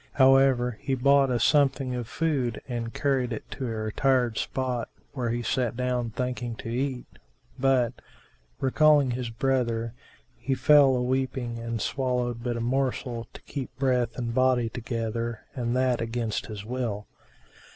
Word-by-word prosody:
However, 130 -3 +4
he 135 -1 0
bought 140 +1 +4
a 120 -2 +1
something 135 0 +3
of 120 -2 -3
food 135 -6 -1
and 120 -2 -3
carried 130 -3 0
it 115 - -4
to 135 - -4
a - - -3
retired 115 +2 +1
spot 125 -3 -2 0.2
where 125 -4 -2
he 120 +1 -1
sat 120 -1 0
down 125 -2 0
thinking 125 0 -3
to 115 - -7
eat; 130 +1 -2 0.5
but, 130 -3 +3 0.7
recalling 145 0 +4
his 120 -1 -3
brother, 115 -2 0 0.5
he 130 +3 -1
fell 145 -2 +6
a 125 - 0
weeping 130 -2 -1
and 115 0 -3
swallowed 125 -1 -1
but 120 -1 -1
a - - -3
morsel 125 -1 -1
to - - -12
keep 135 -3 -5
breath 130 -3 +1
and 120 -2 -2
body 130 -2 +3
together, 115 -1 -3
and 120 -2 -2
that 130 -2 +2
against 115 -1 -2
his 105 -2 -7
will. 115 -4 -3
125 Hz, 150 wpm, -27 LUFS, 115-130 Hz, 0.7 s, fell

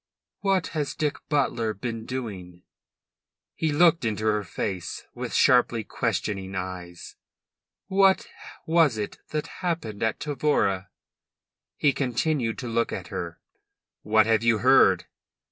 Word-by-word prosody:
"What 195 -3 +1
has 150 -3 -3
Dick 150 -1 -1
Butler 120 -7 0
been 115 +1 -5
doing?" 95 -9 -6 0.9
He 160 -1 -1
looked 165 +1 +4
into 110 -1 -1
her 105 -1 +2
face 95 -3 -4
with - - -5
sharply 120 -2 +4
questioning 95 -3 -2
eyes. 90 -2 -6 0.7
"What 195 0 +4 0.4
was 160 -7 +3
it 105 -1 -4
that 150 -1 -2 0.2
happened 165 - -3
at 115 -1 0
Tavora?" 135 -10 0 0.9
He 145 -2 +3
continued 125 -2 0
to 125 - -5
look 115 0 0
at - - -5
her. 85 -1 -5 0.6
"What 110 0 +4
have 110 -1 +3
you 115 -1 +3
heard?" 130 +4 +5
115 Hz, 125 wpm, -26 LUFS, 105-150 Hz, 0.9 s, heard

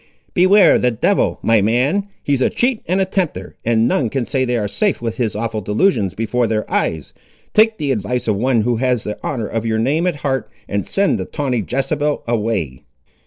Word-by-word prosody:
"Beware 185 0 +5
the 125 - +2
devil, 125 - +1
my 115 -2 +4
man! 130 - +1 0.2
He's 140 -2 0
a - - +3
cheat 245 -2 0
and 185 +3 +1
a 190 - +2
tempter, 185 -3 -3
and 115 0 +2
none 125 -5 +1
can 130 +1 -2
say 130 +1 0
they 125 -1 0
ar' 105 -2 -1
safe 205 - 0
with 115 -1 -4
his 115 -5 -1
awful 110 0 -3
delusions 105 - +1
before 115 +2 0
their 110 -1 -1
eyes! 80 -3 -1 0.4
Take 220 +1 +4
the 145 -6 -1
advice 120 +1 -2
of 105 - +2
one 120 +2 +1
who 120 +1 0
has 125 -2 0
the 105 - -6
honour 120 -6 -2
of 110 +2 -3
your 110 -1 0
name 145 +10 +1
at 175 - 0
heart, 135 -3 -1 0.2
and 100 -1 -2
send 200 0 +1
the - - -3
tawny 135 -6 -2
Jezebel 145 +3 -1
away." 105 - -1
125 Hz, 205 wpm, -18 LUFS, 110-150 Hz, 0.4 s, Beware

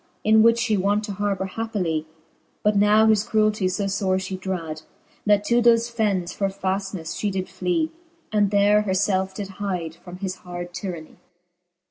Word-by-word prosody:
In 220 +1 +5
which 230 +1 +4
(he 220 - +1
wont 205 +3 +1
to 210 - -5
harbour 200 -1 -1
happily: 185 -7 -2 0.6
But 210 0 +3
now 210 +2 +5
his 215 -2 +4
cruelty 215 -3 +1
fo 195 +2 -1
fore 195 -1 0
fhe 190 0 -4
drad, 165 -5 -4 0.5
That 205 -1 +4
to 235 +3 +2
thofe 235 0 +4
fennes 200 -6 0
for 195 - 0
faftnefle 190 -3 -3
Ihe 205 - +1
did 185 -1 -3
fly, 190 - -1 0.4
And 205 -2 +3
there 205 +1 +4
her 200 -3 -1
ielfe 190 -1 0
did 200 -1 -4
hyde 180 -5 -3
from 175 +2 -11
his 190 -1 -4
hard 175 0 -7
tyranny. 175 -5 -6
200 Hz, 170 wpm, -23 LUFS, 185-210 Hz, 0.6 s, In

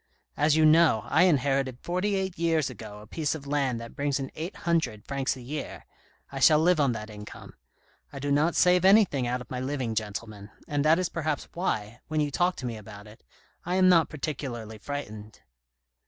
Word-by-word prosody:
As 150 +1 +3
you 155 0 +4
know, 155 -8 +5
I 160 +8 +4
inherited 135 -5 +1
forty 185 +6 -1
eight 190 -2 -2
years 160 -5 +1
ago 105 -3 -10
a - - -12
piece 155 +7 -2
of 145 -3 -9
land 140 -4 0
that 115 0 -10
brings 140 0 -1
in 135 -1 -5
eight 165 +5 -6
hundred 145 -12 0
francs 135 -1 -1
a - - -10
year; 145 +4 -6 0.5
I 135 - -5
shall 150 +4 +6
live 170 +1 +3
on 140 -4 +3
that 110 -1 -7
income. 105 0 -11 0.6
I 140 - -9
do 140 +1 -3
not 155 +4 +2
save 180 0 +4
anything 190 - +4
out 125 +1 -2
of - - -12
my 125 - -3
living, 130 -3 -2
gentlemen; 105 -1 -5 0.2
and 145 -1 0
that 155 +2 +5
is 185 -2 -1
perhaps 155 -3 -3
why, 115 - -3
when 155 -1 -1
you 145 -1 0
talk 175 +4 +1
to 130 - -7
me 115 -2 -4
about 105 0 -11
it, 105 +1 -15 0.4
I 180 +2 -2
am 185 0 +5
not 165 -3 +5
particularly 130 -7 -5
frightened." 110 -5 -7
140 Hz, 200 wpm, -27 LUFS, 115-160 Hz, 0.6 s, shall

